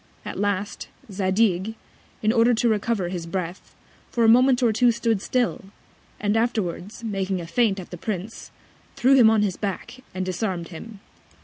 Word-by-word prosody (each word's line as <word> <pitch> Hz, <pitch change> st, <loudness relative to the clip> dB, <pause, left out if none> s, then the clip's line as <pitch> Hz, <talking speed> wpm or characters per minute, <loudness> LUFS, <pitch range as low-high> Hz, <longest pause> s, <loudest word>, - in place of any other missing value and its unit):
At -, -, -5 dB
last, 205 Hz, 0 st, -2 dB, 0.2 s
Zadig, 190 Hz, +1 st, +1 dB, 0.5 s
in 215 Hz, +1 st, +3 dB
order 235 Hz, 0 st, +4 dB
to 235 Hz, -, +1 dB
recover 215 Hz, -4 st, 0 dB
his 175 Hz, -2 st, -5 dB
Breath, 180 Hz, 0 st, -5 dB, 0.3 s
for 235 Hz, -, 0 dB
a -, -, +5 dB
Moment 250 Hz, +2 st, +5 dB
or 230 Hz, -2 st, +3 dB
two 240 Hz, +3 st, +4 dB
stood 230 Hz, -3 st, 0 dB
still, 245 Hz, -4 st, -1 dB, 0.5 s
and 205 Hz, +1 st, 0 dB
afterwards, 220 Hz, -2 st, -2 dB
making 195 Hz, -3 st, -2 dB
a 170 Hz, -, -6 dB
Feint 200 Hz, +2 st, +1 dB
at 180 Hz, -, -10 dB
the 175 Hz, -, -6 dB
Prince, 205 Hz, +3 st, -5 dB, 0.5 s
threw 260 Hz, +3 st, +4 dB
him 245 Hz, -5 st, +7 dB
on 220 Hz, -1 st, +3 dB
his 195 Hz, -3 st, -1 dB
Back, 225 Hz, +5 st, -5 dB
and 185 Hz, 0 st, -2 dB
disarm'd 185 Hz, -2 st, -3 dB
him. 200 Hz, +5 st, -10 dB
210 Hz, 170 wpm, -24 LUFS, 185-230 Hz, 0.5 s, him